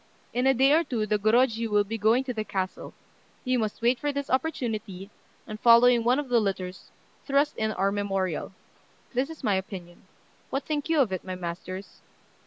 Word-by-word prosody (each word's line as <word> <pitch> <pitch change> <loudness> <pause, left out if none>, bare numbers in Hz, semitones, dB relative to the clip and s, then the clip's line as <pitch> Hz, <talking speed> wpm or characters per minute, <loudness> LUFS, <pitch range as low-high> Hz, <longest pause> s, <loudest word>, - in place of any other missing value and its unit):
In 250 +2 +1
a 270 - +5
day 270 +3 +4
or 325 +2 +4
two 240 -8 -2
the 210 0 0
Gorôjiu 230 +2 +2
will 205 -1 +3
be 225 +2 -5
going 225 +5 +3
to 255 -2 -4
the 215 -2 -3
castle; 190 -3 -4 0.5
we 255 0 +1
must 220 -1 -2
wait 240 +1 +3
for 290 - -1
this 280 0 -4
opportunity, 220 - -2 0.3
and 215 -1 -8
following 235 0 +6
one 245 +3 +3
of 290 -1 -2
the 245 -2 +3
litters, 190 -3 -4 0.4
thrust 280 +1 +2
in 220 0 -1
our 195 0 +1
memorial. 195 -5 -2 0.6
This 255 +4 0
is 320 - -10
my 210 - +2
opinion: 190 -2 -6 0.4
what 270 - -2
think 300 0 -3
you 320 -3 +4
of 235 -7 +1
it, 185 - -3
my 185 -1 -5
masters?" 180 +2 -7
225 Hz, 195 wpm, -27 LUFS, 195-260 Hz, 0.6 s, following